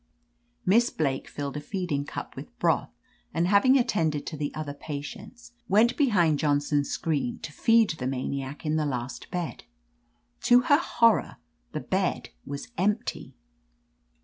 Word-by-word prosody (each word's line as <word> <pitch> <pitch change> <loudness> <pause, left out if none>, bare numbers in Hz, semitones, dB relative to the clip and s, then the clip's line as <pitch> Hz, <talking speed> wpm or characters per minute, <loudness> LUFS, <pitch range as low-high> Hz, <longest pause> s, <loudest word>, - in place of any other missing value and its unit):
"Miss 235 +6 +4
Blake 135 -4 -1
filled 145 0 -5
a - - -4
feeding 150 -4 -2
cup - - -7
with - - -10
broth, - - +1 0.5
and 170 +1 +2
having 210 +8 +5
attended 165 - 0
to - - -5
the 145 -1 -3
other 150 -2 -4
patients, 145 - -8 0.2
went 220 +5 +4
behind 180 - +3
Johnson's 145 -1 +1
screen 145 -6 -1
to - - -5
feed 225 +1 +4
the 135 -5 -4
maniac 135 +2 -4
in 155 +1 +1
the 155 - +1
last 125 -2 -4
bed. 175 -2 -4 0.8
To 245 0 +7
her 285 +4 +4
horror, 230 -9 +2 0.4
the - - -3
bed - - -1 0.2
was 140 +8 -6
empty 210 +4 -1
155 Hz, 145 wpm, -27 LUFS, 145-210 Hz, 0.8 s, To